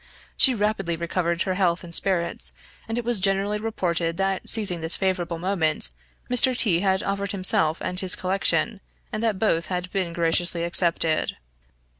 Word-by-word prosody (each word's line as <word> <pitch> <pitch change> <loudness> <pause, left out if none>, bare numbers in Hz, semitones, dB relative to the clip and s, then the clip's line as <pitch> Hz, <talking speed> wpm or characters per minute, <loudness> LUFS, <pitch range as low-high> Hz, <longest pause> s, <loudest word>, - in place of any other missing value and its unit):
She 260 -2 +5
rapidly 205 -5 -1
recovered 170 +1 -1
her 190 - -2
health 180 -2 0
and 170 -1 -11
spirits, 175 -2 0 0.3
and 225 - -3
it 240 - -3
was 240 -3 +1
generally 195 +2 +1
reported 170 -6 -2
that 195 -1 -1
seizing 200 -7 +2
this 160 +1 +5
favorable 180 -3 -2
moment, 165 - 0 0.4
Mr. 250 +1 +1
T 205 -8 +3
had 190 0 0
offered 200 0 -3
himself 165 -4 +2
and 180 - -4
his 185 -1 +3
collection, 195 +3 0 0.3
and 215 - -4
that 225 -4 0
both 170 -5 0
had 180 0 -4
been 185 -3 -2
graciously 170 0 0
accepted. 170 -2 +2
185 Hz, 160 wpm, -24 LUFS, 170-200 Hz, 0.4 s, She